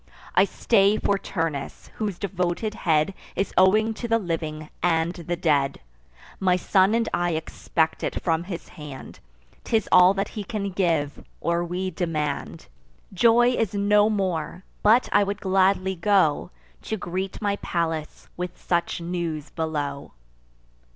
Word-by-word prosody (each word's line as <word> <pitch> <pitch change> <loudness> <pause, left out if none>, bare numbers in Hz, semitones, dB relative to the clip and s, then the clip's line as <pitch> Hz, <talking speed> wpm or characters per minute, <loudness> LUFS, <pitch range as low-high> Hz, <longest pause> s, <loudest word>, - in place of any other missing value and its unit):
I - - +5
stay 205 -2 +3
for 200 -1 +1
Turnus, 160 -7 -4
whose 205 -5 -2
devoted 190 +2 -2
head 160 -1 +1 0.2
Is 195 - -1
owing 215 +4 +4
to 235 +2 -5
the 230 0 +3
living 155 -5 -4
and 165 0 +1
the 175 0 -4
dead. 145 -5 +1 0.6
My 185 -2 +3
son 190 +3 +3
and 230 -1 +1
I 175 -1 +1
expect 160 0 -1
it - - -2
from 165 0 0
his 175 -2 -7
hand; 145 -4 -10 0.4
'Tis 220 -3 0
all 180 +1 +7
that 195 - -1
he 210 - -5
can 200 -2 -3
give, 165 -6 0 0.2
or 170 0 0
we 180 +2 -3
demand. 155 -6 -3 0.5
Joy 235 +5 +5
is 225 -5 -1
no 205 +1 +4
more; 185 -4 -2 0.2
but 225 +4 +5
I 205 - +5
would 200 +1 -3
gladly 190 0 +2
go, 185 -4 +2 0.3
To 220 - -3
greet 185 +1 -4
my 205 -1 0
Pallas 165 -4 -3
with 180 0 -5
such 170 0 -1
news 170 -3 -4
below." 145 -3 -3
180 Hz, 145 wpm, -24 LUFS, 165-200 Hz, 0.6 s, all